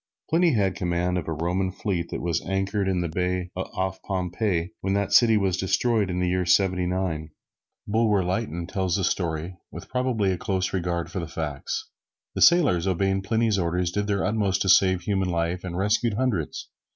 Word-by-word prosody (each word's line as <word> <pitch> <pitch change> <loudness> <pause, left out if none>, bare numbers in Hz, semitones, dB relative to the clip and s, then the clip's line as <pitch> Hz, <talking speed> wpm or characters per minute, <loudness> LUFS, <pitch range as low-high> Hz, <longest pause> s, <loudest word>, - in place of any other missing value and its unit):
Pliny 165 -1 +4
had 100 -5 +2
command 90 -1 -1
of 80 - -7
the - - -2
Roman 90 +4 -1
fleet 90 -3 -3
that - - -5
was 85 -2 -1
anchored 95 +1 -1
in 95 -2 +1
the 85 - -1
bay 90 +2 -2
off 95 0 -3
Pompeii, 90 -1 -1
when 95 +1 0
that 100 0 -1
city 115 -3 +6
was 95 -3 +1
destroyed 100 +2 +1
in 90 0 -2
the 90 - +1
year 90 +1 +1
Seventy 90 0 +2
nine. 90 -4 -2 0.6
Bulwer 105 -2 +2
Lytton 90 -2 -2
tells 95 -1 -1
the 95 - -1
story, 85 -1 -2
with - - -9
probably 125 -6 0
a 90 - -3
close 95 -1 -1
regard 85 -2 -2
for 95 - -3
the 85 - -4
facts. 75 -5 -4 0.5
The - - -4
sailors, 130 - +5
obeying 95 +1 +1
Pliny's 110 +1 +1
orders, 90 0 0
did 105 +2 -1
their 100 -1 0
utmost 100 -3 +1
to 95 - -1
save 95 -1 +5
human 95 -2 0
life, 85 +1 -1
and 90 -2 -5
rescued 105 +3 +1
hundreds. 105 - -2
95 Hz, 190 wpm, -25 LUFS, 90-100 Hz, 0.6 s, city